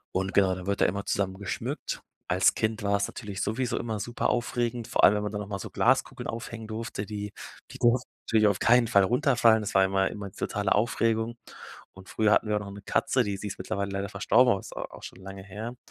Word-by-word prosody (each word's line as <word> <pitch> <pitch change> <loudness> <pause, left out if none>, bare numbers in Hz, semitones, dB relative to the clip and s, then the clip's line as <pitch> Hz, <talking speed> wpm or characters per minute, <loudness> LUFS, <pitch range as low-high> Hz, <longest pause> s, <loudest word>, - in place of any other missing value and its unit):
und 95 +1 -1
genau, 95 -2 +4
da 90 0 -8
wird 100 0 -1
da - - +6
immer 100 +2 -1
zusammen 95 -1 -1
geschmückt. 100 -3 -4 0.3
Als - - +3
Kind 110 +1 -1
war's 100 0 +1
natürlich 100 -4 -6
sowieso 120 +2 -1
immer 110 -3 -3
super 120 +3 -1
aufregend, 120 -1 -1
vor - - 0
allem, - - +8
wenn 105 - 0
man 105 - -3
dann 105 0 -3
noch 105 - -6
mal 100 -1 -3
so - - -7
Glaskugeln - - +1
aufhängen 115 -1 -6
durfte, 110 -2 -4
die 105 -1 -5 0.4
die - - -9
durften 120 +1 +2 0.2
natürlich 110 -1 +4
auf 100 -2 +2
keinen 120 0 +5
Fall 100 -2 +5
runterfallen. 120 -1 +4
Das 105 - -5
war 95 - +6
immer 95 0 +2
immer 100 -1 -7
die - - -24
totale 100 -1 0
Aufregung 115 +1 +1 0.6
und 95 0 -14
früher 110 -1 +2
hatten - - +3
wir 105 - +1
auch - - 0
noch 100 -1 -7
'ne 100 0 -10
Katze, - - +1
die 100 -1 -2
sie 105 - -6
ist 100 - -5
mittlerweile 100 +1 -3
leider 100 0 -3
verstorben, 115 +5 +4
aber 100 - -1
ist - - -11
a - - -4
auch - - -12
schon 95 - -10
lange 95 0 -8
her. 110 +5 -7
105 Hz, 240 wpm, -27 LUFS, 100-115 Hz, 0.6 s, allem